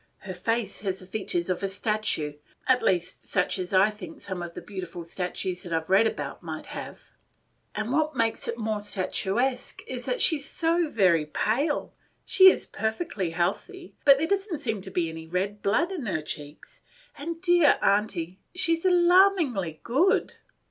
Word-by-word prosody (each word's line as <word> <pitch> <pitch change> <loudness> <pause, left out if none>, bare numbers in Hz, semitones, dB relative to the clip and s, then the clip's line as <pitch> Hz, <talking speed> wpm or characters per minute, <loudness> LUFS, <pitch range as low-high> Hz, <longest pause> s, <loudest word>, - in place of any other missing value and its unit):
Her 190 - -6
face 220 +3 -2
has 190 -2 -2
the 185 - -11
features 185 -3 -3
of 185 -1 -1
a 195 - -1
statue, 200 -7 -1 0.3
at 260 -1 +3
least 180 -1 -1
such 180 -1 0
as 180 -1 -4
I 195 +2 +5
think 185 -6 -10
some 185 -2 -5
of 170 -1 -7
the - - -5
beautiful 180 -4 -7
statues 180 +1 -3
that 175 - -8
I 165 - +2
've 160 +3 -10
read 205 +4 +6
about - - -5
might - - -6
have; - - -8 0.6
and 215 +3 -2
what 310 0 +1
makes 230 -2 0
it 235 - -3
more 215 -2 -1
statuesque 205 +5 -2
is, - - -6
that - - -1
she 320 -3 +4
's 285 - -7
so 335 -1 +1
very 175 - +3
pale; 265 - 0 0.3
she 380 -1 +8
is - - 0
perfectly 220 - -2
healthy, 195 - -3
but 275 -1 +7
there 305 - 0
does 395 +3 -1
n't 320 - -2
seem 225 -8 -2
to 190 - -8
be 175 -3 0
any 160 0 -8
red 195 +4 -2
blood 300 - +1
in 315 -11 -4
her 155 -6 -1
cheeks; 150 0 -8 0.3
and, 330 +3 -5
dear 350 -4 +5
Aunty, 195 -3 +1 0.2
she 335 -3 +2
is 330 +2 -3
alarmingly 350 - +4
good. 290 +11 +2
210 Hz, 185 wpm, -27 LUFS, 180-300 Hz, 0.6 s, she